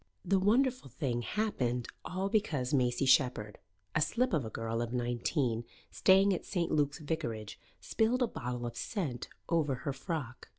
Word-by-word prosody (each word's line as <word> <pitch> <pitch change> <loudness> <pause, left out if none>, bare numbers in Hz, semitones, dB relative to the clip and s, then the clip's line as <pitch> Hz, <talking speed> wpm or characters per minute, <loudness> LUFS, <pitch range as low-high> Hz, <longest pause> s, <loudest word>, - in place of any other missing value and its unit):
The 195 +2 +3
wonderful 240 - +2
thing 125 -2 -2
happened 125 - -1 0.2
all 190 +2 -2
because 155 - 0
Maisie 125 0 +2
Shepherd, 125 -6 +3 0.3
a 155 - +2
slip 240 +8 +1
of 150 -5 +2
a 110 - -5
girl 115 +1 -2
of 120 -1 -3
nineteen, 120 0 0 0.3
staying 195 +1 +5
at 180 - -3
St. 175 -3 -1
Luke's 145 -2 +2
Vicarage, 130 -9 -4 0.2
spilled 240 +3 +1
a - - +2
bottle 125 - -4
of 120 - -5
scent 145 - -3 0.2
over 155 -5 +1
her 140 - 0
frock. 135 -4 -5
140 Hz, 160 wpm, -32 LUFS, 120-190 Hz, 0.3 s, staying